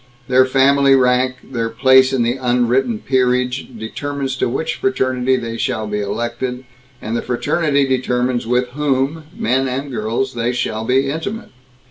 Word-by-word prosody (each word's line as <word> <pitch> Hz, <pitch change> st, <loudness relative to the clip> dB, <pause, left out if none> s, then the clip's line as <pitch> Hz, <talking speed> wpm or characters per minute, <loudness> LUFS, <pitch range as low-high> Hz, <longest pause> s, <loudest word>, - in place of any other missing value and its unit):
Their 130 Hz, 0 st, +4 dB
family 135 Hz, +1 st, +4 dB
rank, 130 Hz, 0 st, +2 dB, 0.2 s
their 115 Hz, -2 st, -2 dB
place 130 Hz, +2 st, +5 dB
in 130 Hz, -3 st, +1 dB
the 120 Hz, +2 st, 0 dB
unwritten 125 Hz, -1 st, +1 dB
peerage, 125 Hz, 0 st, +1 dB
determines 135 Hz, +4 st, -4 dB
to -, -, 0 dB
which 135 Hz, +6 st, -2 dB
fraternity 130 Hz, 0 st, +1 dB
they 115 Hz, -2 st, -4 dB
shall 110 Hz, -1 st, -2 dB
be 105 Hz, 0 st, -3 dB
elected, 120 Hz, +5 st, -3 dB, 0.4 s
and 110 Hz, +2 st, -3 dB
the -, -, -1 dB
fraternity 140 Hz, +4 st, 0 dB
determines 125 Hz, -2 st, 0 dB
with 125 Hz, +1 st, +1 dB
whom 145 Hz, +3 st, -1 dB
men 130 Hz, +3 st, +1 dB
and 135 Hz, +2 st, -4 dB
girls 120 Hz, +3 st, -2 dB
they 120 Hz, +1 st, -1 dB
shall 110 Hz, -2 st, -2 dB
be 130 Hz, +3 st, +2 dB
intimate. 200 Hz, +9 st, -5 dB
130 Hz, 150 wpm, -18 LUFS, 120-135 Hz, 0.4 s, place